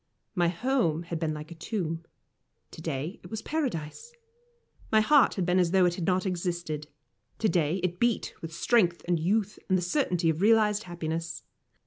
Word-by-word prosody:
My 175 -4 +2
home 175 - +1
had 170 -1 -4
been 155 -2 -1
like 150 +2 -8
a - - -5
tomb; 165 -2 -3 0.7
to - - -10
day 160 +3 -4
it - - -11
was 220 -1 -5
Paradise. 285 - -3 0.8
My 220 - +6
heart 280 +6 +5
had 185 - 0
been 180 +1 +3
as 175 -2 +3
though 185 +1 +4
it 175 - +2
had 175 -2 -4
not 185 0 +2
existed; 170 -4 -3 0.5
to 220 - +1
day 165 -3 +1
it 180 -1 -1
beat 235 -1 +1
with 165 - -6
strength 175 0 +2
and 175 -2 +2
youth, 205 +5 0
and 185 - +4
the - - -1
certainty 175 - +1
of 160 +2 -4
realised 215 -1 +4
happiness. 165 -1 -4
175 Hz, 180 wpm, -28 LUFS, 165-210 Hz, 0.8 s, My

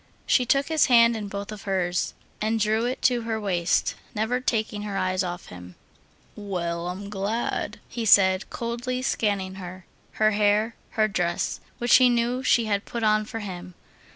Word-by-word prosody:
She 250 -2 +2
took 275 +4 +2
his 315 -2 +3
hand 235 -1 +6
in 210 -2 -4
both 200 +1 -6
of 210 -2 -8
hers, 180 -3 -1 0.3
and 220 +1 0
drew 220 +2 +1
it 250 +2 -3
to 245 -2 +3
her 225 -1 -2
waist, 180 -5 0 0.2
never 220 +4 0
taking 220 -4 -1
her 205 -2 -4
eyes 185 -1 0
off 175 0 -6
him. 90 0 -11 0.6
"Well, 175 -4 -3
I'm 190 +3 -5
glad," 210 +3 -3
he 235 - -5
said, 190 -2 +5
coldly 240 +2 -3
scanning 200 -6 -1
her, 180 0 -9 0.3
her 215 0 +3
hair, 210 +2 +2 0.2
her 215 0 +4
dress, 175 -4 -1 0.2
which 240 0 +5
he 255 -1 +5
knew 240 +1 +1
she 240 -2 +3
had 205 -1 0
put 235 -1 -5
on 215 0 +3
for 225 +1 -6
him. 180 -3 -8
210 Hz, 175 wpm, -25 LUFS, 190-235 Hz, 0.6 s, hand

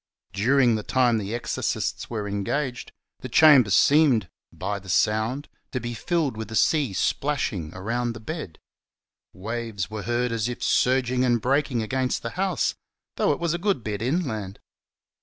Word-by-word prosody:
During 120 +4 +3
the 110 - -1
time 120 0 +2
the 105 +2 -4
exorcists 120 - -2
were 105 -3 -3
engaged, 120 +6 -3 0.3
the - - -7
chamber 145 -8 +7
seemed 125 - +4
— - - -68 0.2
by 100 0 -1
the 95 -1 -13
sound 110 +8 +1
— - - -48
to 130 - -1
be 120 0 -5
filled 155 +1 -1
with 110 -1 -5
the 110 - -7
sea 145 +1 +2
splashing 95 - -1
around 115 +5 -2
the 115 - -9
bed; 110 - -6 0.7
waves 110 -2 -4
were 110 -1 -4
heard 120 +2 -1
as 115 0 -1
if 125 - -6
surging 130 0 +2
and 120 -2 +2
breaking 130 -1 0
against 130 +2 -1
the 115 - -4
house, 190 -1 0 0.4
though - - +2
it 145 - -1
was 170 -1 0
a 175 - -2
good 195 - 0
bit 105 -1 -4
inland. 115 - -2
120 Hz, 170 wpm, -25 LUFS, 110-135 Hz, 0.7 s, chamber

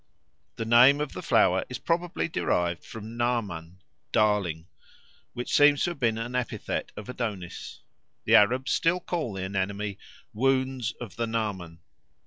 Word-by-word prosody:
The 115 - -4
name 125 +5 +6
of 150 -1 -3
the - - -6
flower 95 +1 +3
is 125 - -4
probably 170 +6 -1
derived 90 - -1
from 110 0 -9
Naaman 95 -8 -2 0.3
("darling"), 100 -7 +1 0.7
which 120 - -4
seems 145 -1 +5
to 175 - +1
have 170 - -9
been 115 -4 +1
an 115 +2 -4
epithet 125 -1 -3
of 105 - -7
Adonis. 105 -8 -5 0.4
The - - +1
Arabs 125 +6 +5
still 170 +2 +2
call 165 - -3
the 95 -1 -4
anemone 100 +1 -2 0.4
"wounds 130 0 0
of 120 -5 -8
the 115 -1 -1
Naaman." 95 -8 -3
115 Hz, 145 wpm, -27 LUFS, 100-130 Hz, 0.7 s, name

